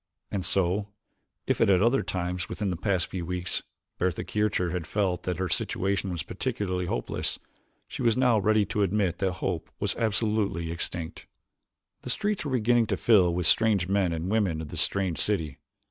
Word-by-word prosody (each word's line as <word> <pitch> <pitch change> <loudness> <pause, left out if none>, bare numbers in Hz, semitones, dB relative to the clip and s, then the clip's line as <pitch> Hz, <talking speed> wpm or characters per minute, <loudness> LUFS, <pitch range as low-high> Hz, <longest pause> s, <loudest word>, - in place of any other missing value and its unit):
And 100 -2 -2
so, 95 +3 +1 0.6
if - - 0
at - - +5
other 115 +8 +4
times 90 -1 -3
within 105 -3 -2
the - - -1
past 95 0 0
few 90 -2 -5
weeks 90 +1 -2 0.4
Bertha 90 -2 0
Kircher 105 -5 0
had 90 -2 -3
felt 95 -1 0
that 90 - -1
her 95 0 -1
situation 95 +3 -1
was 85 -4 -3
particularly 90 -3 -2
hopeless, 60 - -2 0.5
she - - -6
was 115 -1 +3
now 125 -4 +4
ready 105 +1 +3
to 105 +2 -1
admit 95 -3 +1
that 95 -2 +1
hope 90 -2 -3
was - - 0
absolutely 105 -6 0
extinct. 85 0 -4 0.7
The - - -7
streets 210 - 0
were 145 - -3
beginning 120 -1 +3
to - - 0
fill 95 -7 +5
with 90 0 -1
the - - +7
strange 105 -6 +2
men 95 -2 +2
and 85 +1 -3
women 100 -8 +1
of 80 -2 -6
this - - -1
strange 95 -4 0
city. 80 -10 0
95 Hz, 180 wpm, -27 LUFS, 90-105 Hz, 0.7 s, the